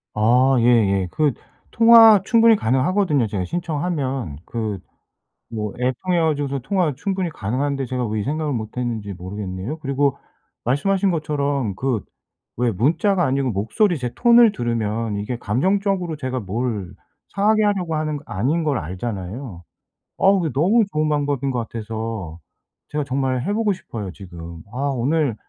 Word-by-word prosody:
아 125 +5 +4
예예. 105 -6 +3
그 150 -3 +1 0.4
통화 225 -3 +8
충분히 230 0 +5
가능하거든요 145 - +1
제가 100 -3 -3
신청하면. 145 - -3
그 110 -4 -3 0.7
뭐 105 -3 -4
앱 125 +1 +1
통해 180 -1 +2
가지고서 145 -4 0
통화 170 +2 0
충분히 190 +2 -2
가능한데 135 +3 -2
제가 125 0 -2
왜 110 +1 -2
이 - - -3
생각을 150 +1 -2
못 110 -1 -5
했는지 115 -5 -3
모르겠네요. 95 - -6
그리고 140 -1 0 0.5
말씀하신 190 +10 +1
것처럼 145 - -1
그 125 0 -1 0.6
왜 120 0 +1
문자가 170 - +2
아니고 135 0 0
목소리 120 - +1
제 125 -2 -3
톤을 235 -2 +6
들으면 115 - -2
이게 105 +5 -3
감정적으로 180 - 0
제가 130 -3 -3
뭘 105 -1 -3 0.4
상하게 215 +2 +3
하려고 185 -6 0
하는 155 -1 -1
거 145 - -8
아닌 135 - 0
걸 145 -4 +1
알잖아요. 95 - -6 0.6
어우 195 -2 +3
이게 150 - -2
너무 195 - +3
좋은 155 0 +1
방법인 145 -2 0
것 125 - -3
같아서 110 -6 -5 0.5
제가 150 0 -2
정말 130 -1 -1
해 205 - -1
보고 215 -1 +1
싶어요 115 - -7
지금. 85 -3 -10
아 - - -7 0.2
오늘 135 0 0
135 Hz, 325 characters per minute, -21 LUFS, 110-165 Hz, 0.7 s, 통화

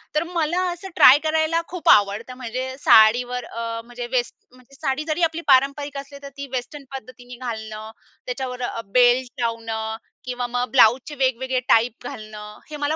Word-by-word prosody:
तर 305 - +2
मला 340 0 -1
असं 355 +3 -8
ट्राय 270 -5 +8
करायला 315 +1 +1
खूप 360 -1 -2
आवडतं. 210 +4 +3
म्हणजे 255 +2 -5
साडीवर 245 +3 +4
अ, 230 0 -5
म्हणजे 245 0 -7
वेस्ट 245 -2 -1 0.2
म्हणजे 255 +2 -20
साडी 270 +3 -2
जरी 315 +3 -1
आपली 330 +1 0
पारंपरिक 280 +2 +2
असली 280 0 -8
तर 280 - -7
ती 280 0 -6
वेस्टर्न 260 +3 -5
पद्धतीने 245 0 -10
घालणं. 220 -1 -6 0.3
त्याच्यावर 250 0 -5
अ, 230 -1 -3
बेल्ट 245 0 +3
लावणं 225 -1 -3 0.3
किंवा 245 -1 -3
मग 245 +1 -2
ब्लाउजचे 260 +3 +4
वेगवेगळे 260 -1 0
टाइप 235 +1 +2
घालणं, 210 -1 -9
हे 300 - -6
मला 290 +2 -1
250 Hz, 160 wpm, -22 LUFS, 230-280 Hz, 0.3 s, ट्राय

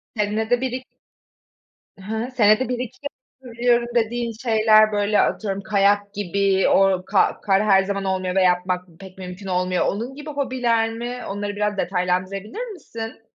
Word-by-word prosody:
Senede 220 +3 0
bir 260 -2 -1
iki 255 0 -5 1.1
Hı 190 - -15
hı. 220 +4 -3
Senede 225 0 +3
1-2 250 0 -4 0.4
yapabiliyorum 240 -1 +1
dediğin 235 0 0
şeyler, 215 -2 +5
böyle, 205 0 +2
atıyorum, 200 -2 -1
kayak 205 0 +1
gibi 195 -1 +1
o 190 -1 +3
ka 195 -1 +1
kar 195 0 +2
her 195 -2 +5
zaman 200 0 -3
olmuyor 185 -1 -1
ve 190 - +4
yapmak 180 0 +1
pek 190 -1 -12
mümkün 185 +1 -8
olmuyor. 180 0 0
Onun 235 +6 -3
gibi 295 +1 -8
hobiler 250 -5 0
mi? 245 +2 -5
Onları 205 +1 -4
biraz 210 0 -1
detaylandırabilir 190 - -2
misin? 225 - -8
210 Hz, 150 wpm, -22 LUFS, 195-235 Hz, 1.1 s, şeyler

